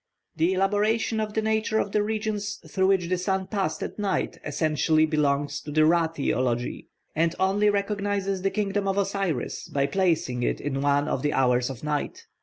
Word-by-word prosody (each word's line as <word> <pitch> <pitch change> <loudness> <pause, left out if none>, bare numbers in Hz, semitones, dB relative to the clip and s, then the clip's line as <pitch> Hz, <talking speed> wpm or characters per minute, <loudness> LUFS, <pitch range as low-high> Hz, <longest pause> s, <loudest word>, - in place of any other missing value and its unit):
The 170 +4 +2
elaboration 210 +4 +1
of 215 -1 -3
the 220 - +1
nature 220 0 +1
of 200 - 0
the 210 - +2
regions 210 -1 -2
through 190 -1 +1
which 190 -3 +2
the 180 0 0
sun 190 +1 -1
passed 195 -1 -2
at - - -6
night 200 -2 -1
essentially 155 0 +2
belongs 145 -2 0
to 150 - -8
the 155 +1 +4
Ra 165 +1 +4
theology, 130 -6 -2 0.3
and 165 +1 +1
only 200 +2 +3
recognises 200 -1 -1
the 195 - +1
kingdom 200 -1 -1
of 195 0 0
Osiris 195 -8 -2
by 140 -1 0
placing 155 -6 0
it - - 0
in 135 -1 -2
one 145 +1 +2
of 130 - -1
the 150 +1 0
hours 125 -1 +2
of 130 -1 -8
night. 150 -1 -3
185 Hz, 185 wpm, -26 LUFS, 150-205 Hz, 0.3 s, the